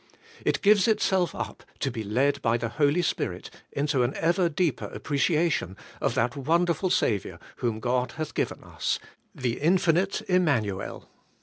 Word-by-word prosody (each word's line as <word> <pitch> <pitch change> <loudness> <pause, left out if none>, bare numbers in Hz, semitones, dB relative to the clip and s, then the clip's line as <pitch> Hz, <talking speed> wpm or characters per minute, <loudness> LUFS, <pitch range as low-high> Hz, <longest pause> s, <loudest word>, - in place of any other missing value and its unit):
It - - 0
gives 205 -1 +5
itself 190 -5 +2
up - - -5 0.2
to 135 - -1
be 115 -2 -4
led 135 +7 +1
by 115 +1 +2
the 115 -1 -3
Holy 150 +6 +2
Spirit - - -2 0.2
into 140 -2 0
an 120 +3 0
ever 170 +1 +2
deeper 155 -4 0
appreciation 150 - 0 0.2
of - - 0
that 120 +4 +1
wonderful 170 +6 +1
Saviour 105 - 0 0.2
whom 115 -3 -1
God 125 +1 0
hath 155 -1 -5
given - - -2
us, - - -2 0.2
— - - -41
the 120 -2 0
Infinite 180 +3 +2
Immanuel. 140 - 0
145 Hz, 150 wpm, -27 LUFS, 120-175 Hz, 0.2 s, gives